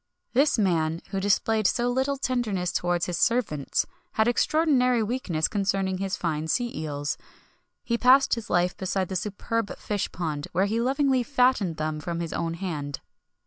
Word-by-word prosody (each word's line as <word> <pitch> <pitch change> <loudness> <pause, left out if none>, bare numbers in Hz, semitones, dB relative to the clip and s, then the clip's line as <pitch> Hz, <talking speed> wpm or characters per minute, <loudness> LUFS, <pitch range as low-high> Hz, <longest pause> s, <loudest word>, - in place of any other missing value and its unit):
[XXI - - -56
58] 255 - +5
This 290 -2 +2
man, 165 -5 +1
who 195 - -1
displayed 205 +2 +2
so 240 0 +1
little 265 +3 0
tenderness 220 -9 -1
towards 175 -1 0
his 175 -1 -3
servants, 210 - +1 0.3
had 220 - +3
an 240 - +4
extraordinary 255 -5 +2
weakness 205 -9 -1
concerning 195 -2 0
his 195 -1 -2
fine 160 -2 -2
sea 240 +8 0
eels. 145 -2 -3 0.6
He 235 -1 -1
passed 265 +2 +5
his 230 -3 -3
life 175 +1 +2
beside 190 -1 -2
the 190 - -4
superb 210 +3 -2
fish 205 -2 -3
pond, 155 -4 -3
where 185 +3 +3
he 220 +3 0
lovingly 265 +1 +2
fattened 250 - +2
them 155 0 -2
from 170 +2 -4
his 165 -1 -4
own 165 0 -2
hand. 150 -6 -4
195 Hz, 175 wpm, -26 LUFS, 170-245 Hz, 0.6 s, 58